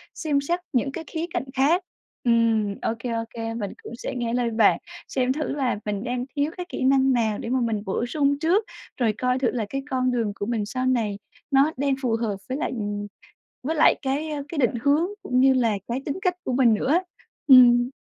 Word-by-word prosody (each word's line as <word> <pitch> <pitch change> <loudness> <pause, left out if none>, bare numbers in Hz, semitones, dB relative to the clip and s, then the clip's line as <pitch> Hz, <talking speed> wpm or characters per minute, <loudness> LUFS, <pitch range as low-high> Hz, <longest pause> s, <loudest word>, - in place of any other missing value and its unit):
xem 290 -4 0
xét 345 +5 -1
những 270 +2 +1
cái 325 - -6
khía 325 0 -3
cạnh 355 - -1
khác. 300 +7 +2 0.4
Ừm, 230 -4 +2
ô - - 0
kê, 245 - -4
ô 230 0 -1
kê, 225 -1 -5
mình 210 -4 -4
cũng - - -8
sẽ - - -5
nghe 235 -1 -2
lời 245 -1 +1
bạn 220 -2 +4 0.3
xem 260 0 0
thử 305 +1 -3
là 260 -7 -1
mình 205 -1 -2
đang 245 0 -2
thiếu 290 +2 0
cái 360 - -4
kỹ - - -4
năng 265 0 +4
nào 220 -4 +1
để 230 - -5
mà 260 0 +1
mình 220 -3 -1
bổ 195 +5 -1
sung 285 +1 +1
trước, 360 +7 +2 0.3
rồi 230 -4 +1
coi 250 0 0
thử 255 -3 +1
là 230 -4 -2
cái 275 0 -3
con 255 -2 +1
đường 230 -4 0
của 200 - -4
mình 225 -2 -1
sau 255 +4 -3
này 220 -6 0 0.3
nó 275 +3 +4
đang 275 0 +1
phù 240 -4 +1
hợp 210 -3 -1
với 260 - -2
lại, 335 - -2
ừm 205 -2 -3 0.6
với 310 +5 -1
lại 310 - +6
cái 280 +3 -1 0.2
cái 320 - -5
định 245 -3 +2
hướng 295 +5 +3 0.2
cũng 255 0 +1
như 265 +1 +6
là 235 -4 +2 0.2
cái 245 +3 -2
tính 285 +5 -2
cách 365 -2 +2
của - - -2
mình 245 -3 +4
nữa 210 - -2
á. 350 - +3 0.4
Ừm. 245 -2 +7
255 Hz, 230 wpm, -24 LUFS, 230-280 Hz, 0.6 s, Ừm